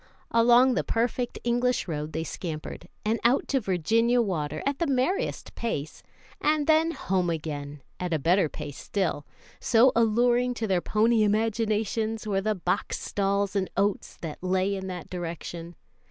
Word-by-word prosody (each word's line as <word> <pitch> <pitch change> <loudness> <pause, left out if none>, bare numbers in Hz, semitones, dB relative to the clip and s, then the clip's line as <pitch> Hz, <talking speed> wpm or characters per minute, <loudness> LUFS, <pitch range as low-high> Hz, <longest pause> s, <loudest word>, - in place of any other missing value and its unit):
Along 240 +3 +5
the - - 0
perfect 240 +1 -1
English 245 0 +1
road 150 -2 -3
they 160 +1 -2
scampered, 160 -1 -6 0.2
and 220 +2 +1
out 245 +3 +3
to 270 - +2
Virginia 225 +5 +2
Water, 155 -8 -1
at 280 0 -1
the 335 - +1
merriest 285 - -1
pace, 155 -11 -4 0.4
and 300 0 +2
then 315 +1 +4
home 185 - -1
again 145 -3 -5 0.2
at 180 -1 -3
a 160 - +2
better 170 +3 +2
pace 145 -2 -7
still, 175 -7 -2 0.3
so 240 +3 +5
alluring 240 +2 +3
to 225 - -2
their 190 -4 +1
pony 225 +3 +2
imaginations 220 +1 0
were 195 -2 0
the 215 +1 0
box 180 +1 -2
stalls 200 0 -1
and 190 -2 0
oats 200 0 0
that 160 -3 -6
lay 185 +2 +1
in 190 -1 -5
that 180 -3 -6
direction. 170 -1 -6
205 Hz, 155 wpm, -27 LUFS, 175-235 Hz, 0.4 s, Along